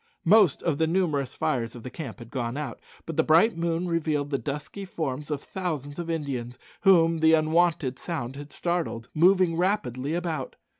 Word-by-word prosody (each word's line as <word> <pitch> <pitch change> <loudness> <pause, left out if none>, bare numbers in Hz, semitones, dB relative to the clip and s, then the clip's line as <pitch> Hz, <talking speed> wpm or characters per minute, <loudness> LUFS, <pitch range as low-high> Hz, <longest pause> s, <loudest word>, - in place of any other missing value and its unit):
Most 195 -3 +5
of 160 -5 0
the 160 - +3
numerous 160 -7 0
fires 125 -7 -1
of 120 - -10
the 125 - -7
camp 140 -9 -7
had 120 -2 -12
gone 125 -1 -3
out, 145 -7 -5 0.3
but 165 -1 -6
the 160 - +4
bright 165 +9 +4
moon 170 +1 -1
revealed 155 -4 -1
the 140 - 0
dusky 150 +7 -5
forms 150 -6 -4
of 145 -2 -3
thousands 155 -6 -4
of 170 -1 -4
Indians, 130 -7 -3 0.2
whom 165 -4 +5
the 160 0 +5
unwonted 155 -4 +2
sound 135 -7 -4
had 145 +1 -9
startled, 170 -10 -2
moving 180 +1 +4
rapidly 165 - 0
about. 165 -6 -3
155 Hz, 180 wpm, -26 LUFS, 140-170 Hz, 0.3 s, Most